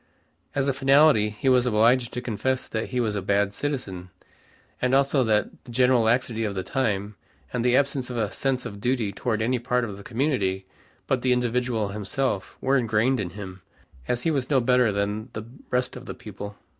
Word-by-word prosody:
As 140 -1 +1
a 140 - +2
finality 135 -4 +5
he 105 +5 -5
was 125 -1 +4
obliged 120 +2 +3
to 125 - -3
confess 125 +2 -1
that 110 0 -3
he 125 - -1
was 110 -3 0
a 100 - -2
bad 100 +1 +1
citizen, 100 -12 -4 0.7
and 125 +1 +2
also 140 0 +3
that 110 -2 +1
the 125 - -10
general 125 0 +4
laxity 115 -1 +1
of 105 -2 -2
the 95 - -2
time, 105 -5 -1 0.4
and 125 -2 -1
the 125 +1 +4
absence 140 -2 0
of 125 - -4
a 105 -3 0
sense 130 -2 -1
of 100 0 -7
duty 120 -3 0
toward 110 +2 -1
any 125 +2 +1
part 125 +1 0
of 105 -4 -5
the 100 - -11
community 110 -7 -1 0.4
but 130 -2 0
the 130 - +1
individual 120 -3 0
himself 105 +1 -2
were 135 +1 +3
ingrained 115 +2 +1
in 95 -4 -2
him, 95 -2 -8 0.5
and 125 - +1
he 145 +7 0
was 135 -4 -1
no 140 -3 +4
better 125 -2 +3
than 105 +3 -2
the 110 - -5 0.3
rest 125 0 0
of 125 0 -10
the - - -6
people. 100 -1 -9
120 Hz, 200 wpm, -25 LUFS, 105-130 Hz, 0.7 s, finality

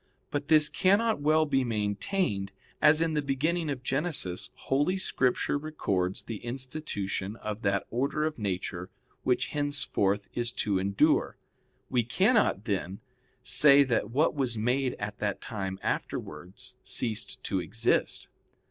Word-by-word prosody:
But 145 0 -2
this 155 -1 +6
cannot 205 +2 +2
well 155 +2 +4
be 135 -3 +1
maintained, 105 - -1 0.3
as 155 +1 +6
in 165 -1 0
the 150 - +1
beginning 155 +4 0
of 135 -3 -4
Genesis 135 - -2
Holy 145 +8 0
Scripture 130 -5 +1
records 100 -12 -2
the 115 - -5
institution 120 -6 -4
of 110 -1 -5
that 100 -2 0
order 140 +5 0
of 155 -5 -3
nature 95 -2 -3 0.3
which 125 0 +1
henceforth 145 -9 0
is 120 0 -1
to 100 -3 0
endure. 100 +1 +2 0.5
We 125 - +2
cannot, 185 - +2
then, 95 -3 -2 0.4
say 140 +2 +6
that 125 -4 0
what 145 +7 +2
was 130 -6 -1
made 125 +4 0
at 105 0 -6
that 105 -2 -1
time 95 -4 -4
afterwards 85 +5 -4
ceased 110 -3 -2
to 95 - -1
exist. 115 +7 0
125 Hz, 135 wpm, -29 LUFS, 100-150 Hz, 0.5 s, this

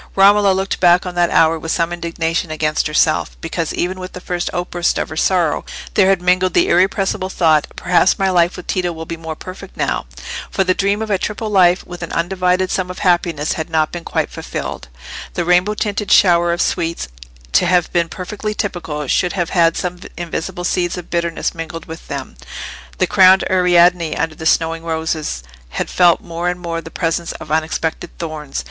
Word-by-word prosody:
Romola 200 +1 +6
looked 190 +1 -1
back 175 0 +5
on 180 - -4
that 175 -1 +2
hour 160 0 +3
with 160 +1 -4
some 170 0 0
indignation 165 0 -2
against 155 0 0
herself, 155 +1 +1
because 165 0 -3
even 185 +2 -2
with 185 0 -7
the - - -7
first 175 -1 -3
outburst 175 0 -1
of - - -2
her 160 - -7
sorrow 170 -2 +1 0.3
there 190 -2 +4
had 190 -2 +2
mingled 180 0 +2
the - - +4
irrepressible 190 +1 +1
thought, 160 -5 +2
"Perhaps 180 +1 +3
my 195 -1 +1
life 175 -1 +2
with 180 - -8
Tito 180 -2 -1
will 160 0 -7
be 165 - -5
more 160 -1 -6
perfect 185 +3 -10
now." - - -1 0.4
For 190 - +1
the 185 0 +2
dream 200 +3 0
of 215 - -4
a 195 - +2
triple 215 +2 -3
life 185 -2 +4
with 175 -1 -9
an 170 - -5
undivided 180 +1 0
sum 185 -1 -1
of 180 - -7
happiness 170 -4 +1
had 160 +1 -4
not 155 -1 +1
been 175 -1 -6
quite - - -2
fulfilled. - - -6 0.5
The 175 - -1
rainbow 180 +4 +3
tinted 210 -1 -2
shower 175 -2 +5
of 170 0 +1
sweets, 165 - -2 0.4
to 175 - +3
have 175 -1 +2
been 170 -1 +1
perfectly 210 +4 -5
typical, 170 -8 -3
should 175 +6 +1
have 175 -4 -2
had 165 -2 +3
some 180 0 -3 0.2
invisible 175 +1 -4
seeds 175 0 0
of 175 - -9
bitterness 170 -1 -1
mingled 165 0 -7
with 165 0 -10
them; 135 - -6 0.6
the - - +3
crowned 190 0 +6
Ariadne, 175 -2 +4
under 160 -1 -1
the 160 0 -4
snowing 165 0 +1
roses, 160 - -2 0.3
had - - -2
felt 175 -2 +4
more 170 +1 -3
and 180 0 -3
more 165 -1 -4
the 160 - -10
presence 165 0 -2
of 150 - -10
unexpected 160 +1 -1
thorns. 155 -4 -5
175 Hz, 195 wpm, -18 LUFS, 165-185 Hz, 0.6 s, Romola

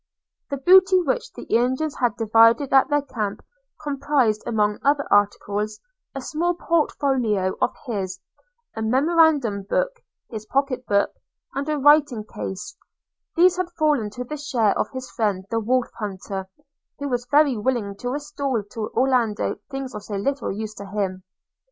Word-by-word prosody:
The 280 - -2
booty 370 +6 +6
which - - -1
the - - -9
Indians 260 +6 0
had 245 -4 0
divided 230 +4 +4
at 270 -1 +5
their 290 -1 +2
camp 210 -7 -4 0.4
comprised, 275 -6 +1
among 210 -2 +1
other 285 0 +2
articles, 205 +1 +1 0.4
a 270 - -4
small 345 +6 -1
port 335 -2 +1
folio 220 -9 0
of - - +1
his, 190 -6 -3 0.6
a 220 - -4
memorandum 275 -2 +3
book, - - +1 0.4
his 215 -2 -7
pocket 270 -1 -1
book, 200 -1 +2 0.4
and 280 +2 -3
a 305 - 0
writing 290 -5 +4
case: 190 -1 -6 0.6
these 360 +1 +5
had 365 -1 -1
fallen 295 -9 +2
to 245 +4 -6
the 300 +5 -6
share 245 -8 +1
of - - -1
his 260 -1 -7
friend 205 -5 -1
the 230 - +1
Wolf 245 +3 0
hunter, 195 -2 -5 0.5
who 285 - -4
was 245 -2 -2
very 290 -2 +4
willing 215 -3 -1
to 245 - -4
restore 280 -4 -2
to 220 -2 -4
Orlando 245 -4 +1
things 270 -2 -5
of 210 - -6
so 205 - -5
little 275 +8 -1
use 215 +2 -5
to 200 - -7
himself. 195 -2 -3
250 Hz, 155 wpm, -23 LUFS, 210-285 Hz, 0.6 s, booty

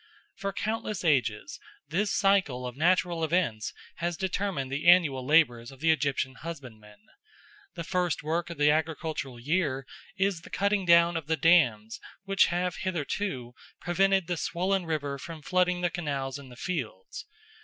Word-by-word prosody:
For 195 0 -3
countless 215 -1 -3
ages 125 -5 0 0.3
this 195 +7 0
cycle 190 -11 +2
of 125 -1 -6
natural 175 +1 +2
events 155 -10 0 0.3
has 170 0 -2
determined 190 -8 -2
the 145 +5 -2
annual 155 -8 +5
labours 125 -5 +3
of 135 - -14
the 160 +2 +3
Egyptian 140 -3 0
husbandman. 110 -10 -10 0.7
The 170 - -4
first 180 -2 -1
work 165 +3 -1
of 170 - -7
the 150 0 +4
agricultural 155 -4 -2
year 140 -1 -1 0.3
is 195 -3 0
the - - -13
cutting 200 -2 0
of 170 -2 +4
the 160 0 +1
dams 125 -9 +3 0.2
which 195 0 +3
have 180 0 -1
hitherto 155 -7 -3 0.3
prevented 190 +1 +2
the 175 0 -2
swollen 185 +2 -1
river 145 -3 -2
from 160 +1 -9
flooding 180 +1 +1
the 175 -1 0
canals 140 -6 -3
and 135 -2 -12
the - - -11
fields. 475 - -5
165 Hz, 150 wpm, -28 LUFS, 135-180 Hz, 0.7 s, annual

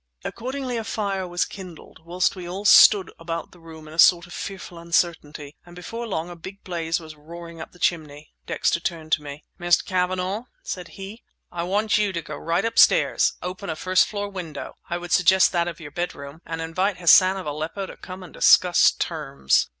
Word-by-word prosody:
Accordingly 255 0 -4
a 225 - -3
fire 200 -4 -3
was 175 0 0
kindled, 180 -5 -11
whilst 180 +3 0
we 180 -2 -7
all 195 +3 -6
stood 200 -2 +7
about 165 -1 -5
the 175 - -18
room 160 -2 -12
in 155 - -11
a 160 - -8
sort 175 -1 +6
of 175 - -13
fearful 185 -3 -7
uncertainty; 160 -4 -2
and 175 0 -15
before 230 +7 -6
long 170 -5 -3
a 175 - -9
big 190 +4 -11
blaze 170 -2 -2
was 160 -2 -11
roaring 165 +2 -10
up - - -9
the - - -18
chimney. 155 -4 -2
Dexter - - 0
turned 165 -3 -5
to 155 - +3
me. 145 0 -9 0.2
"Mr. 175 0 +2
Cavanagh," 185 +4 -1 0.2
said 180 -2 -5
he, 200 +4 -9 0.3
"I 175 - -4
want 205 +5 +1
you 205 -2 +1
to 170 - -2
go 150 - -7
right 170 +7 -1
upstairs, 230 - +4
open 185 +2 -5
a 160 - -2
first 185 +3 +2
floor 205 -1 -4
window—I 175 -2 -7
would 175 0 -8
suggest 185 +2 +5
that 170 -1 0
of 170 -2 -6
your 145 -3 -9
bedroom—and 160 0 -6
invite 185 +4 -1
Hassan 185 +2 +6
of 190 - -6
Aleppo 155 +6 -4
to - - -10
come 185 0 -10
and 180 - -13
discuss 180 -1 +5
terms!" 140 - 0
175 Hz, 195 wpm, -23 LUFS, 165-190 Hz, 0.3 s, stood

